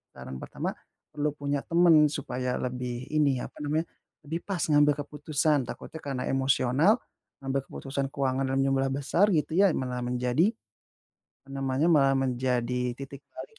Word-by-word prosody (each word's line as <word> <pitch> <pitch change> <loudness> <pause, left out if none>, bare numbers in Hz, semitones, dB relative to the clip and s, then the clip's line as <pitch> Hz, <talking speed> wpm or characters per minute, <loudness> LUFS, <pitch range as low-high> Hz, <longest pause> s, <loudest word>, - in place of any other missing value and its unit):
saran 65 0 -8
pertama, - - -4 0.4
perlu 150 0 0
punya 145 -1 -2
temen 165 -3 +5
supaya 125 -3 -3
lebih 125 0 -4
ini, 145 -4 +2
apa - - -9
namanya, 155 +3 0 0.4
lebih 165 +3 -3
pas 195 -3 -3
ngambil 145 -1 +5
keputusan. 150 -1 0
Takutnya, 160 - -8
karena 135 -3 -3
emosional 135 - +3 0.5
ngambil 135 0 -1
keputusan 135 0 -3
keuangan 135 -1 0
dalam 135 +1 0
jumlah 135 0 +1
besar, 145 +9 +2
gitu 155 0 0
ya 200 0 +6
malah 125 -1 -3
menjadi, 125 - +1 0.9
apa 135 - -24
namanya 135 +2 0
malah 135 -4 +5
menjadi, 125 -1 0
titik 135 +1 -9
balik 455 -2 -10
135 Hz, 145 wpm, -28 LUFS, 130-150 Hz, 0.9 s, ya